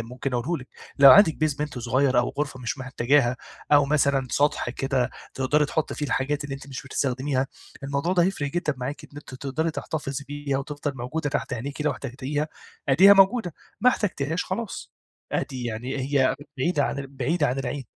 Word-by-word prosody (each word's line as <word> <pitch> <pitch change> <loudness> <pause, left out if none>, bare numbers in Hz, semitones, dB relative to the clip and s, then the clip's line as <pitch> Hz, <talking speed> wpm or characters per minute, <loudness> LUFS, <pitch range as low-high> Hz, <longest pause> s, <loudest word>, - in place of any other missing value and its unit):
ممكن 125 +4 -5
أقوله 140 +8 0
لِك، - - -17 0.3
لو 140 -1 +10
عندِك 175 -1 +8
basement 150 -3 -2
صغير 130 +2 +2
أو 120 - +2
غرفة 140 -3 -2
مش 120 +3 -3
محتاجاها، 130 0 +2 0.4
أو 145 -1 +7
مثلًا 140 -2 +2
سطح 145 -3 +1
كده 130 -1 -1 0.2
تقدري 145 +3 +2
تحطّي 160 - -2
فيه 150 - -3
الحاجات 140 +2 -1
اللي 140 -1 -4
أنتِ 135 - -10
مش 130 - -6
بتستخدميها، 135 0 -1 0.4
الموضوع 140 +6 -1
ده 175 -2 +4
هيفرِق 170 -6 -1
جدًا 155 -2 -1
معاك 140 +4 -5
إن 140 - -16
أنتِ 145 -3 -9
تقدري 140 +5 -2
تحتفظي 140 -3 -4
بيها 145 -2 -2
وتفضل 145 0 -4
موجودة 140 +4 -3
تحت 140 -1 -2
عينيكِ 135 +5 -5
لو 150 - +2
احتجتيها 140 +4 -3 0.4
آدِيها 185 +9 +8
موجودة، 195 -2 +4 0.3
ما 250 - +6
احتجتيهاش 165 - -1
خلاص، 205 +2 -5 0.4
عادي 130 -2 -2
يعني 120 +3 -4
هي 135 0 +2 0.2
بعيدة 145 +1 +1
ع - - -1
بعيدة 140 +4 0
عن 130 +1 -1
العين. 135 0 -3
140 Hz, 175 wpm, -25 LUFS, 130-150 Hz, 0.4 s, لو